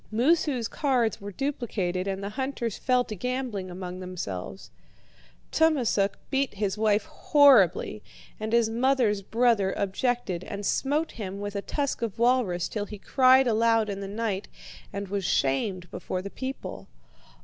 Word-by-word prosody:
Moosu's 260 0 +2
cards 250 -8 0
were 200 +1 -6
duplicated 200 -8 -2
and 195 0 -3
the 200 - -3
hunters 260 -3 -3
fell 250 -1 +2
to 220 - -7
gambling 245 -3 -3
among 180 0 -6
themselves. 170 - -6 0.8
Tummasook 245 -11 +2
beat 270 -4 0
his 200 -1 -1
wife 215 +1 +2
horribly, 275 - +4 0.4
and 215 0 -3
his 235 -1 +4
mother's 235 -3 +2
brother 225 -2 +2
objected 200 -2 -1
and 200 +1 -6
smote 295 +8 0
him 200 -3 -6
with 205 0 -5
a 200 - -1
tusk 280 +3 -2
of 225 -4 -3
walrus 235 -7 +2
till 210 -2 -3
he 210 - -8
cried 260 +5 +5
aloud 225 -2 +2
in 195 - -5
the 200 - -5
night 205 -1 -3 0.4
and 200 0 -4
was 200 0 -2
shamed 180 +5 0
before 180 +1 -4
the 200 - -6
people. 195 - -6
215 Hz, 150 wpm, -27 LUFS, 195-255 Hz, 0.8 s, cried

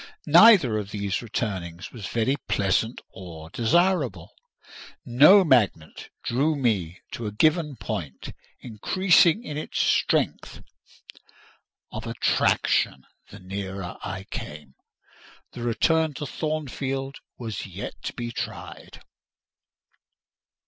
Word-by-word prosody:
Neither 165 - +6
of 100 -1 -6
these 100 -2 -3
returnings 95 -6 -4
was 110 -5 -7
very 120 +4 0
pleasant 105 +4 0
or 80 -4 -10
desirable: 150 - +1 0.7
no 150 +12 +7
magnet 110 - +1
drew 145 +6 +1
me 100 - -1
to 115 - -5
a - - -4
given 155 - +1
point, 90 - -6 0.3
increasing 175 - +3
in 150 -7 -6
its 155 - -4
strength - - 0 1.3
of 110 +1 -6
attraction 90 - +1 0.2
the 100 - -11
nearer 95 -1 -6
I 95 +1 -5
came. 75 -3 -8 0.8
The 120 - -9
return 155 +6 +1
to 145 - -5
Thornfield 135 -2 -4 0.2
was 110 -5 -5
yet - - -7
to - - -3
be 120 0 -5
tried. - - -8
120 Hz, 105 wpm, -25 LUFS, 95-150 Hz, 1.3 s, no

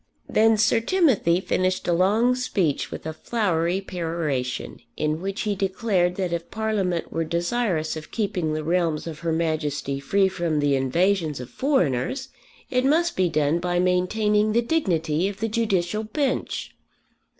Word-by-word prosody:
Then 220 0 +4
Sir 225 +2 +3
Timothy 230 - +2
finished 185 0 -1
a 175 - +3
long 210 +8 +3
speech 195 - -1
with - - -8
a 160 - -3
flowery 180 -2 0
peroration, 165 -9 -3 0.2
in 155 +1 -1
which 195 +2 -3
he 210 - 0
declared 190 -2 0
that 180 -3 -2
if 170 0 -4
Parliament 205 -6 -1
were 165 - 0
desirous 170 0 -1
of 155 -1 -8
keeping 185 -8 -1
the 155 0 -2
realms 165 -1 0
of 160 -2 -6
Her 170 -1 -2
Majesty 155 -4 -1
free 195 +8 +2
from 170 -5 -1
the 145 -1 +2
invasions 160 +3 +1
of 125 0 -8
foreigners 180 - 0 0.4
it 250 0 +2
must 325 +5 +2
be 185 -2 +2
done 155 +1 +1
by 175 0 -1
maintaining 210 +4 +2
the 235 +1 +3
dignity 175 - 0
of 200 0 -6
the 225 - 0
Judicial 215 -3 0
bench. 260 +5 -2
180 Hz, 155 wpm, -24 LUFS, 160-215 Hz, 0.4 s, Then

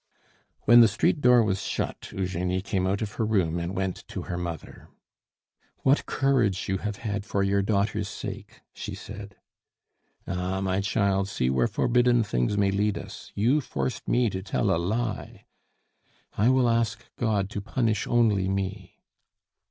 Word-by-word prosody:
When 120 +2 +7
the 115 - +8
street 110 - +1
door 125 -2 +6
was 95 -2 0
shut, - - -4
Eugenie 90 0 -2
came 95 -2 -1
out 100 +3 0
of 105 - -4
her 115 - -2
room 95 -6 +1
and 85 +3 -4
went 95 -1 -1
to - - -5
her 90 - -4
mother. 85 -3 -6 0.9
"What 135 +2 +3
courage 125 -8 +1
you 95 -2 -1
have 105 0 -3
had 105 -1 -3
for 100 -2 -1
your 100 0 +2
daughter's 100 0 0
sake!" 110 - -8
she - - -6
said. 105 -1 -9 0.9
"Ah! 90 +1 -2
my 95 0 0
child, 100 -2 +1
see 65 -9 0
where 65 -2 +2
forbidden 120 -1 +3
things 65 - 0
may 100 -1 +3
lead 105 +1 0
us. - - -9
You 125 +9 +3
forced 65 - -4
me 120 -3 +2
to 95 - -4
tell 100 +1 0
a - - 0
lie." 110 +4 -3 0.9
"I 110 +5 +3
will 130 -1 +4
ask 115 0 0
God 105 -4 0
to 105 - -4
punish 110 0 -1
only 110 -6 +3
me." 95 0 -4
100 Hz, 160 wpm, -26 LUFS, 95-115 Hz, 0.9 s, the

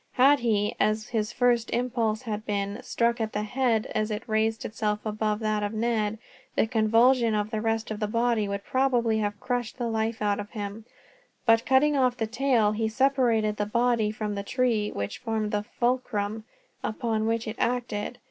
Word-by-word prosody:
Had 275 +3 +5
he, 210 -3 +1
as 215 +1 +1
his 220 -1 -1
first 240 -2 +2
impulse 235 -2 -1
had 215 -3 -4
been, 200 +1 -2
struck 235 0 0
at 220 -1 -2
the 210 - -1
head 235 -1 +1
as 215 0 0
it 210 0 -4
raised 220 0 0
itself 210 -1 -1
above 215 0 -1
that 215 -1 0
of 205 +1 -2
Ned, 220 -1 0 0.4
the - - +3
convulsion 230 +1 +3
of 210 +1 -1
the 215 -2 -2
rest 225 0 -1
of 215 - -4
the 210 - -1
body 230 -1 +1
would 200 0 -3
probably 245 -4 +1
have 205 -1 -2
crushed 245 -2 -3
the 245 - -2
life 225 0 -1
out 205 -1 0
of 205 0 -6
him; 210 0 -6 0.6
but 225 -2 +6
by - - -15
cutting 285 +3 +4
off 255 -2 +2
the 225 - 0
tail, 240 -2 +2
he 220 +1 -1
separated 230 -4 +2
the 205 - -1
body 235 -1 +2
from 215 -1 -3
the 200 - -3
tree 225 -1 0
which 100 0 -4
formed 220 -2 -2
the 210 -1 -1
fulcrum 225 -4 -1 0.4
upon 220 -1 -1
which 230 0 -1
it 220 - -5
acted. 240 -2 -1
220 Hz, 190 wpm, -27 LUFS, 210-240 Hz, 0.6 s, but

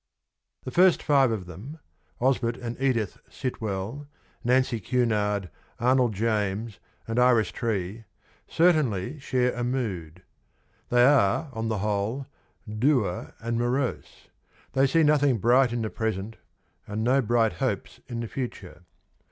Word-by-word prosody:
The 130 - -6
first 180 +5 +4
five 140 -3 +4
of 110 -5 -3
them 105 - -9 0.2
— - - -39
Osbert 120 -3 +1
and 120 -1 -5
Edith 120 -7 0
Sitwell, 110 +2 -4 0.4
Nancy 125 -1 +2
Cunard, 105 -4 0 0.3
Arnold 125 -2 +2
James 105 -1 -1 0.3
and 115 +2 -1
Iris 125 -3 +4
Tree 110 -1 -3 0.2
— - - -34
certainly 150 - +2
share 125 -2 0
a 120 - -3
mood. 95 -10 -3 0.7
They 120 0 +5
are, 135 +2 +3
on 115 -1 -3
the 110 -1 -1
whole, 105 +6 -1 0.4
dour 110 -3 0
and 115 0 -2
morose; 125 +2 -2 0.4
they 135 +1 +4
see 165 +4 +3
nothing 145 -4 +3
bright 120 +4 +4
in 120 -1 -2
the 110 - -3
present, 110 -1 -3 0.5
and 105 +2 -3
no 130 +4 +3
bright 115 -3 +2
hopes 85 - -3
in 120 -2 -4
the 115 - -4
future. 110 -9 -6
115 Hz, 135 wpm, -26 LUFS, 105-130 Hz, 0.7 s, They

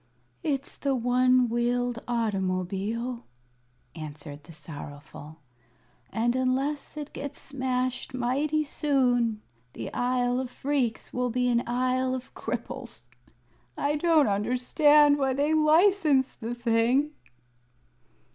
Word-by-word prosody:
"It's 280 -3 -2
the 275 -1 0
one 250 +1 +3
wheeled 240 +1 0
automobile," 210 +2 -2 0.7
answered 150 -2 -9
the 170 - -13
Sorrowful, 150 0 -10 0.7
"and 240 +2 +1
unless 270 +4 -1
it 295 -1 -6
gets 285 -1 -6
smashed 255 -1 -2
mighty 275 +5 0
soon 245 -7 +1 0.3
the 115 - -6
Isle 245 0 +1
of 260 -1 -3
Phreex 260 -4 -2
will 250 0 0
be 250 +1 0
an 235 -1 +3
Isle 255 +1 +1
of 255 -1 -8
Cripples. 240 - -6 0.7
I 290 +1 0
don't 315 -1 +4
understand 285 +8 +4
why 265 -1 +1
they 290 +3 +1
license 310 -3 +4
the 235 +1 -5
thing." 240 +5 +2
250 Hz, 110 wpm, -27 LUFS, 230-275 Hz, 0.7 s, don't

